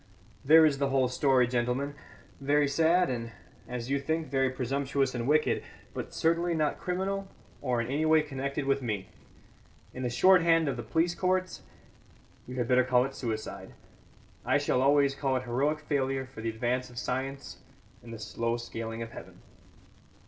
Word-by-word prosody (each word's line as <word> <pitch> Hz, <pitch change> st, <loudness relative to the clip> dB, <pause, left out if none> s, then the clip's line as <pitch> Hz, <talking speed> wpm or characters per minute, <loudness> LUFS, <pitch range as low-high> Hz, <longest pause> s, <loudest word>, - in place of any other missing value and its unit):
There 160 Hz, +3 st, +7 dB
is 140 Hz, -3 st, +2 dB
the 140 Hz, -1 st, +1 dB
whole 135 Hz, -1 st, +2 dB
story, 130 Hz, 0 st, +3 dB
gentlemen, 125 Hz, +3 st, -1 dB, 0.5 s
very 145 Hz, +1 st, +2 dB
sad 165 Hz, +5 st, +3 dB
and, 115 Hz, -2 st, -4 dB, 0.3 s
as 125 Hz, +1 st, -5 dB
you 140 Hz, -, +2 dB
think, 160 Hz, +2 st, -2 dB
very 135 Hz, -1 st, +2 dB
presumptuous 135 Hz, +1 st, -1 dB
and 120 Hz, -1 st, -3 dB
wicked, 155 Hz, +1 st, +2 dB, 0.3 s
but -, -, -6 dB
certainly 170 Hz, +1 st, +1 dB
not 155 Hz, -2 st, 0 dB
criminal 195 Hz, +2 st, -2 dB, 0.3 s
or 125 Hz, -3 st, 0 dB
in -, -, -3 dB
any 145 Hz, +6 st, -1 dB
way 155 Hz, -1 st, +5 dB
connected 140 Hz, -1 st, -4 dB
with 135 Hz, 0 st, +1 dB
me. 105 Hz, -6 st, -3 dB, 0.8 s
In 130 Hz, -, -6 dB
the 125 Hz, -, -1 dB
short 185 Hz, +10 st, +5 dB
hand 165 Hz, -1 st, +3 dB
of 135 Hz, -, -1 dB
the 120 Hz, -, -5 dB
police 165 Hz, +9 st, 0 dB
courts, 185 Hz, +1 st, -1 dB, 0.9 s
you 125 Hz, -, -7 dB
had 120 Hz, -2 st, -1 dB
better 125 Hz, +1 st, +4 dB
call 125 Hz, 0 st, +3 dB
it 135 Hz, -, -6 dB
suicide. 110 Hz, -3 st, -5 dB, 0.7 s
I -, -, +2 dB
shall 125 Hz, -, +1 dB
always 140 Hz, 0 st, +4 dB
call 135 Hz, -1 st, -1 dB
it 130 Hz, -, -1 dB
heroic 140 Hz, +5 st, 0 dB
failure 135 Hz, -2 st, -1 dB
for 130 Hz, -4 st, -11 dB
the 115 Hz, -, -2 dB
advance 120 Hz, +3 st, -2 dB
of 120 Hz, -, -14 dB
science 135 Hz, +3 st, -4 dB, 0.4 s
and 120 Hz, -, -12 dB
the 115 Hz, -, -6 dB
slow 115 Hz, +2 st, -2 dB
scaling 115 Hz, -1 st, -5 dB
of 115 Hz, -, -9 dB
heaven." -, -, -11 dB
135 Hz, 175 wpm, -29 LUFS, 125-150 Hz, 0.9 s, There